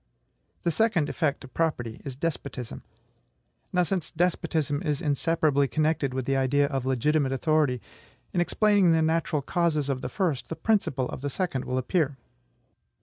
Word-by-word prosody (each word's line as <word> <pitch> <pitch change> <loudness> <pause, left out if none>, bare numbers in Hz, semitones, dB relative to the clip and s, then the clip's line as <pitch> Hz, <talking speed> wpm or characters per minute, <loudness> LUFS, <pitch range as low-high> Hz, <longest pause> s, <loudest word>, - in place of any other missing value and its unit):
The 170 - +2
second 190 -4 +2
effect 145 -3 -1
of 130 - -12
property 120 -9 -1
is 135 -2 -6
despotism. 140 -5 -4 0.9
Now, 180 0 +3
since 180 -2 -2
despotism 160 -3 0
is 150 -5 -1
inseparably 150 -1 +2
connected 155 -2 +1
with 130 -2 -2
the 135 - +1
idea 135 +2 +3
of 135 -3 -2
legitimate 135 +2 +2
authority, 145 -3 +1 0.5
in 175 - +2
explaining 200 -1 +4
the 160 0 +3
natural 160 -2 +1
causes 155 -3 0
of 130 -2 -1
the - - -4
first, 170 -10 -1
the 165 - -3
principle 150 - +1
of - - -6
the 145 - -2
second 140 -4 -2
will 130 - -2
appear. 140 +1 0
150 Hz, 155 wpm, -27 LUFS, 135-165 Hz, 0.9 s, explaining